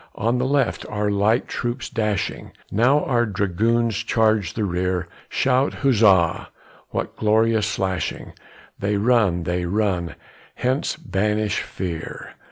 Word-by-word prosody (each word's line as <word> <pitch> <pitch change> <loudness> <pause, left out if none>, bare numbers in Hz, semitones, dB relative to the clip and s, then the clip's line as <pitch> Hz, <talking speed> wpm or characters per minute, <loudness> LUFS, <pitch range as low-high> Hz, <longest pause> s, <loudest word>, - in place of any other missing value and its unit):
On 115 +3 0
the 130 - 0
left, 140 0 +1
our 105 -1 -1
light 105 +4 +2
troops 120 +2 -3
dashing, 105 -3 -2 0.2
Now 125 +8 +3
our 120 -2 +1
dragoons 105 +3 0
charge 110 -5 +1
the 110 - -1
rear, 90 -1 -1 0.2
Shout! 130 +2 +1
huzza! 100 -10 +4 0.4
what - - -4
glorious 110 0 +2
slashing, 95 -3 -3 0.5
They 100 +1 0
run, 105 -6 +2
they 90 +1 -1
run, 90 -3 -1 0.4
hence 130 +4 -1
banish 105 - -1
fear! 85 -3 -6
105 Hz, 120 wpm, -22 LUFS, 95-115 Hz, 0.5 s, huzza